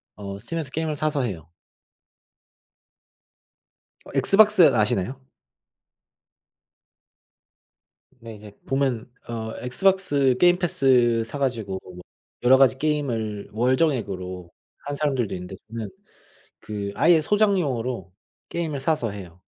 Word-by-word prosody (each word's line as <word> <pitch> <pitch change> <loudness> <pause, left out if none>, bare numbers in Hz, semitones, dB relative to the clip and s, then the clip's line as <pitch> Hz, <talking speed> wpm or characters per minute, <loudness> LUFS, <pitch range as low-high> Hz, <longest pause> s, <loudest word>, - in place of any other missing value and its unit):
어, 100 -1 -7
스팀에서 155 +6 -5
게임을 160 0 -2
사서 150 -2 -1
해요. 85 -8 -5 2.5
어, - - -13
엑스박스 210 -1 +5
아시나요? 110 +4 0 3.0
네, 115 -2 -10
이제 105 0 -12 0.2
보면 135 -4 -1 0.2
어 110 -1 -5
엑스박스 145 -2 +2
게임 175 0 +5
패스 125 -8 +3
사 130 - -6
가지고 115 -8 -2
뭐 90 -1 -11 0.4
여러 130 +2 +6
가지 130 -1 +4
게임을 120 -9 -2
월정액으로 105 - -1 0.4
하는 145 0 -3
사람들도 135 -7 -1
있는데 90 +1 -7
저는 115 -2 -5 0.7
그 100 -2 -5
아예 165 +5 +5
소장용으로 140 - 0 0.4
게임을 160 -5 -3
사서 150 -7 0
해요. 90 -3 -10
125 Hz, 240 characters per minute, -24 LUFS, 105-150 Hz, 3.0 s, 여러